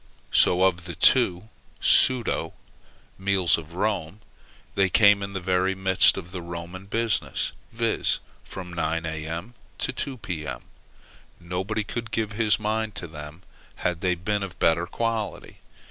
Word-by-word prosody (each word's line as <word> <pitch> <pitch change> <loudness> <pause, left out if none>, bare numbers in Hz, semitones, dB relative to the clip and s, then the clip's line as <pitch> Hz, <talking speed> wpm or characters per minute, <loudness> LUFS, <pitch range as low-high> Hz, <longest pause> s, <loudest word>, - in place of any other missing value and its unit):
So 90 +1 +5
of 90 -2 +2
the 85 -3 -6
two 95 - +4 0.3
pseudo 130 -3 +3 0.7
meals 95 -3 +3
of 85 +1 -8
Rome, 100 -1 -2 0.5
they 95 -1 +2
came 100 0 +6
in 100 0 -5
the 95 - -2
very 95 +1 +1
midst 95 -1 +4
of 85 -2 -7
the 90 -1 -5
Roman 85 +2 -7
business; 115 +1 0 0.2
viz. 115 -1 +1 0.3
from 90 -2 -8
nine, 80 0 -1
A.M. 80 +7 -5 0.2
to 130 - -2
two, 135 0 -4
P.M. 85 -8 -5 0.8
Nobody 95 +5 -2
could 115 +2 -5
give 110 -1 -1
his 110 0 +2
mind 110 0 -1
to - - -5
them, 75 +2 -10 0.4
had 90 -1 0
they 90 -2 +1
been 100 +4 -1
of 95 -2 -6
better 85 +1 +2
quality. 115 +1 -3
95 Hz, 145 wpm, -25 LUFS, 85-110 Hz, 0.8 s, came